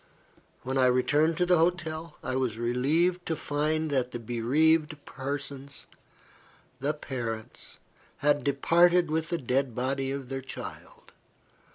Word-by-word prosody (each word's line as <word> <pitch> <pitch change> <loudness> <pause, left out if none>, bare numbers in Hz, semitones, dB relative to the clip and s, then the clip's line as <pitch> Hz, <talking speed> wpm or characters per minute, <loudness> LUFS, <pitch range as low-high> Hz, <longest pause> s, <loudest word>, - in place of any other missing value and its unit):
When 130 +1 -1
I 130 - +5
returned 145 +6 +2
to 180 - +2
the 180 -1 +4
hotel, 165 -1 -1
I 130 - -2
was 125 -4 -1
relieved 150 +10 +1
to 160 - 0
find 155 +1 -1
that 130 -3 +1
the 120 - -5
bereaved 150 +8 +2
parents 140 0 -5 2.4
had 145 0 +2
departed 170 +4 +4
with 160 +1 -1
the 170 - 0
dead 130 -3 0
body 135 +2 -1
of 135 -2 -4
their 135 0 -3
child. 130 0 -9
145 Hz, 125 wpm, -28 LUFS, 130-160 Hz, 2.4 s, I